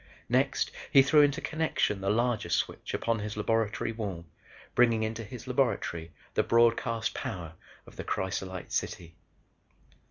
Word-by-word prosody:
Next 130 +2 +2 0.2
he 135 - +8
threw 150 +2 +6
into 145 -1 +3
connection 155 -10 0
the 95 - 0
larger 120 +2 +1
switch - - -1
upon 115 -1 0
his 105 0 -5
laboratory 110 0 0
wall 100 -7 -5 0.5
bringing 115 -2 +4
into 115 +1 -3
his 120 +1 -9
laboratory 125 - 0 0.2
the - - +3
broadcast 115 0 +2
power 85 -4 -5 0.3
of - - -16
the - - -4
crysolite 95 -1 -3
city. 85 -2 -3
115 Hz, 135 wpm, -29 LUFS, 100-125 Hz, 0.5 s, he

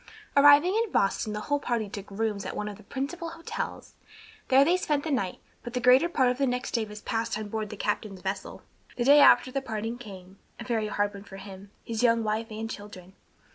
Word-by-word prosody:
Arriving 290 +5 +7
in 450 -2 0
Boston, 200 +2 +1
the 210 - -4
whole 290 +5 0
party 235 -5 -1
took 200 0 -8
rooms 205 0 -2
at - - -5
one 210 - -3
of 210 - -6
the - - -15
principal 285 - -5
hotels. 330 0 -6 0.5
There 270 +1 +6
they 345 +4 +4
spent 300 -5 0
the 315 - -3
night, 195 -9 -1 0.2
but 240 - -8
the 250 - 0
greater 255 +7 +5
part 260 -7 +2
of 250 - -5
the 275 - +2
next 250 +1 -2
day 230 -2 0
was 210 0 -10
passed 230 -1 -2
on 215 -1 -6
board 215 -1 -3
the 215 - -8
captain's 205 -2 -3
vessel. 190 +1 -5 0.3
The 240 - 0
day 285 +4 +7
after 260 - +6
the 275 - -2
parting 225 -1 -4
came; 195 -4 -11 0.2
a - - -5
very 225 -3 -1
hard 205 0 -1
one 200 0 -10
for 195 -1 -11
him, 195 0 -11 0.2
his 225 -1 -3
young 230 -2 +3
wife 215 +1 -1
and 220 +1 -5
children. 205 -4 -10
225 Hz, 225 wpm, -27 LUFS, 205-265 Hz, 0.5 s, Arriving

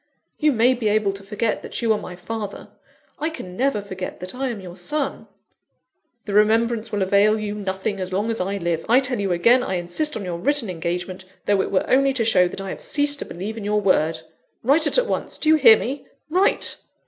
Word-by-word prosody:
You 305 -1 +3
may 245 +1 +4
be 235 -3 -2
able 210 -1 +2
to 195 - -9
forget 210 +2 -2
that - - -6
you 225 -1 +4
are - - -1
my 180 - -8
father; 205 +3 -6 0.5
I 310 - 0
can 185 - -9
never 255 -3 0
forget 190 -2 -6
that 180 +1 -7
I 265 +1 -2
am 230 -4 -5
your 180 -2 -10
son." 275 +11 -3 1.0
"The 205 - -4
remembrance 225 +2 +2
will 205 -2 0
avail 200 +3 +3
you 210 -1 -3
nothing 195 0 -3
as 185 0 -4
long 205 +5 0
as 225 - -2
I 195 +2 -2
live. 170 -3 -2
I 245 +3 +6
tell 255 -3 -2
you 195 -2 -1
again, 235 +9 +4
I 190 - -2
insist 180 - -2
on 205 - -6
your 175 -2 -4
written 260 -1 +1
engagement, 180 +2 -4 0.2
though 200 -2 +3
it - - -3
were 190 - +1
only 275 +1 +3
to 235 -4 0
show 185 -5 +4
that 175 - -7
I 195 - -5
have - - -6
ceased 290 -1 0
to - - -3
believe 195 +6 -6
in 220 - -6
your 210 +1 +1
word. 165 -5 +1 0.4
Write 295 +6 +4
at - - +3
once - - -3
do 310 - 0
you 315 - +7
hear 230 -7 +8
me? 270 +3 -5 0.2
Write!" 370 +4 +3
210 Hz, 225 wpm, -22 LUFS, 185-250 Hz, 1.0 s, hear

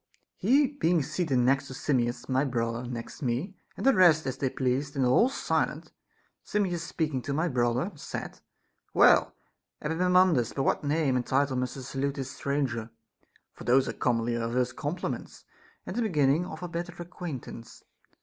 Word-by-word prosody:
He 270 +9 +4
being 175 - +1
seated 160 -2 -1
next 135 +3 +2
Simmias, 125 -2 -1
my 130 +1 +2
brother 120 -2 -2
next 120 +5 -7
me, 135 - -1 0.2
and - - -4
the 270 - +6
rest 170 -6 +5
as 130 - -2
they 135 - +1
pleased, 135 +3 -1
and 135 -2 +2
all 130 - +4
silent, - - -1 0.5
Simmias 185 -5 -1
speaking 155 -5 -2
to 140 - -3
my 160 +4 +1
brother 125 - 0
said: 150 - -7 0.6
Well, - - +5 0.4
Epaminondas, 175 -4 +3
by 135 - -1
what - - +1
name 145 -2 +1
and 125 - +1
title 135 +1 +1
must 125 +1 -2
I - - -6
salute 135 +2 -2
this 135 -2 -5
stranger? 135 -6 -2 0.3
— - - -37
for - - -11
those 130 +2 +3
are - - -2
commonly 120 -1 0
our 115 0 -2
first 125 +1 0
compliments, 150 +5 -4 0.4
and - - -6
the 240 - 0
beginning 155 - +2
of 160 +1 -8
our 175 - -4
better 170 +1 -5
acquaintance. 160 -9 -8
140 Hz, 170 wpm, -28 LUFS, 125-170 Hz, 0.6 s, the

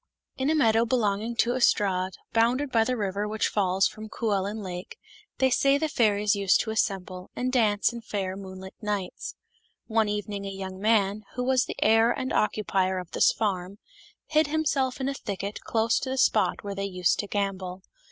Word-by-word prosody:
" - - -54
T - - -1
N - - +2
a 315 - +3
meadow 225 -6 +4
belonging 225 -1 0
to 235 +1 +2
Ystrad, 190 -7 +2 0.2
bounded 245 +5 +2
by 230 - +3
J - - -4
the 255 +1 -1
river 205 0 -2
which 215 +1 0
falls 195 -1 +2
from 215 0 -9
Cwellyn 210 -1 -2
Lake, 180 -1 -7 0.4
they 265 -1 +3
say 275 +2 +4
the 315 +2 0
fairies 210 -6 +2
used 200 -1 +3
to 220 - -4
assemble, 185 -4 -2
and 255 +1 -2
dance 215 -2 +2
in 235 - -7
fair 195 -4 -3
moonlight 190 -1 -9
nights. 205 -4 -4 0.5
One 220 -2 +1
evening 205 -1 -3
a 195 - -4
young 190 -1 -6
man, 210 -1 +2
who 250 - -1
was 255 0 +2
the - - -6
heir 225 +1 +5
and 260 +1 -3
occupier 195 -3 +1
of 180 -2 -6
this - - +4
farm, 195 -2 -2 0.5
hid 310 -1 +2
himself 280 -4 0
in 265 - -1
a 275 - -1
thicket 200 -5 -5
close 225 +1 +2
to 265 - -4
the 265 - -2
spot 220 -4 +2
where 200 -1 -4
they 195 0 -3
used 180 -3 +1
to 205 - -2
gambol. 190 -2 -3
210 Hz, 195 wpm, -27 LUFS, 195-235 Hz, 0.5 s, heir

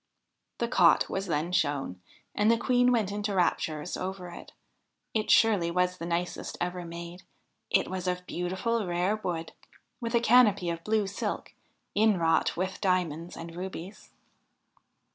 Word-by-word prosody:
The 235 - -1
cot 180 -8 +4
was 195 +1 -2
then 155 +4 -1
shown, 145 - 0 0.3
and 210 +1 +2
the 230 - +5
Queen 245 +1 +3
went 220 -5 +1
into 205 0 -2
raptures 160 -3 0
over 185 -1 -5
it: 175 - -11 0.6
it 215 -1 -1
surely 205 -7 +5
was 180 +1 0
the 165 - -4
nicest 175 +1 -3
ever 180 0 -2
made; 170 +1 -8 0.5
it - - +3
was 185 -1 -4
of 180 0 -2
beautiful, 190 +6 -2
rare 180 +4 +1
wood, 170 -6 -4 0.5
with 235 -1 -2
a - - +5
canopy 215 -7 +4
of 165 0 -6
blue 215 -1 +1
silk, 195 - -4 0.4
inwrought 185 -9 +2
with 185 +1 -3
diamonds 175 -4 0
and 165 0 -8
rubies. 185 +1 -7
180 Hz, 145 wpm, -29 LUFS, 170-210 Hz, 0.6 s, the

